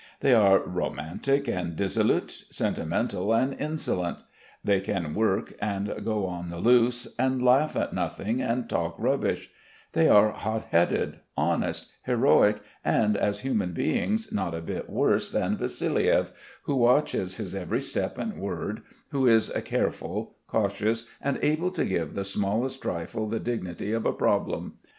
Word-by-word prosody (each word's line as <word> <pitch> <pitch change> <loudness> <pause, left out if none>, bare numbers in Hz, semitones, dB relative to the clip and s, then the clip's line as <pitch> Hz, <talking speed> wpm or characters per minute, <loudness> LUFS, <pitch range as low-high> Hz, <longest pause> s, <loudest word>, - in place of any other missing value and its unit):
They 135 - +5
are 100 -4 +6
romantic 135 - -2
and 90 -6 -2
dissolute, 95 +2 0
sentimental 95 +4 -1
and 130 +4 +2
insolent; 140 - -2 0.5
they 100 -2 +2
can 90 -6 -2
work 105 -1 0
and 100 -1 -1
go 105 -3 0
on 90 -1 -5
the 85 - -6
loose 120 +4 +3
and 130 0 +2
laugh 135 +5 +4
at - - -1
nothing 115 +5 -2
and 120 +1 -1
talk - - -1
rubbish; - - 0 0.4
they - - +4
are 105 +1 +7
hot 110 +1 -3
headed, 85 +1 +2 0.2
honest, - - 0
heroic 105 0 +3 0.2
and 105 -1 +2
as 100 0 0
human 105 -9 -1
beings 215 - 0
not 90 -4 -1
a 80 - -4
bit 80 - -5
worse - - +1
than - - 0
Vassiliev, - - +1 0.3
who 140 - -1
watches 120 -7 +2
his 95 -5 -5
every 95 -3 -2
step - - -2
and - - -4
word, - - -4 0.3
who 135 -2 +1
is 115 -2 +4
careful, - - -2
cautious, 110 +2 0
and 140 -1 0
able 155 +4 +2
to 185 - -1
give 85 -5 -2
the 100 - -2
smallest 105 +7 -1
trifle 90 +6 -3
the 110 +1 -2
dignity 100 -5 -3
of 115 0 0
a - - +1
problem. - - -1
105 Hz, 150 wpm, -27 LUFS, 95-125 Hz, 0.5 s, are